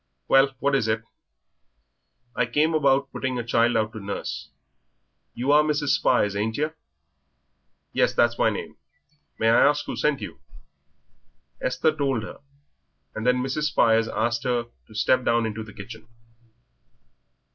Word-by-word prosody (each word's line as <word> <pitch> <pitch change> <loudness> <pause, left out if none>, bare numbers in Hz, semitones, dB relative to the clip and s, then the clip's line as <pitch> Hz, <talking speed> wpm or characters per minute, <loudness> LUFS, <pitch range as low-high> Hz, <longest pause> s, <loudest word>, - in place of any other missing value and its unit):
"Well, 135 0 +4
what 140 +2 0
is 135 -5 +2
it?" 110 0 0 1.3
"I 125 - +1
came 150 +6 +1
about 140 -3 +2
putting 130 -1 -3
a 120 - -2
child 115 0 +2
out 110 0 -1
to 110 - -7
nurse. 85 -6 -5 0.9
You 130 +4 0
are 150 +1 +6
Mrs. 150 -1 0
Spires, 100 -1 +2
ain't 110 +2 -2
yer?" 155 +2 -1 1.2
"Yes, - - +2
that's - - +2
my - - +4
name. - - -6 0.6
May 115 - +2
I 115 - +5
ask 145 +1 +2
who - - -5
sent 150 -2 0
you?" - - -8 1.2
Esther 155 +4 +1
told 135 -6 -1
her, - - -9 0.7
and 110 +2 -4
then 125 0 +2
Mrs. 135 +3 -2
Spires 115 -6 +3
asked 115 +2 -1
her 120 -2 0 0.2
to 110 - -16
step 130 +4 +2
down 115 -1 +2
into 110 0 -4
the 110 -1 -9
kitchen. 110 +3 -11
120 Hz, 150 wpm, -24 LUFS, 110-140 Hz, 1.3 s, are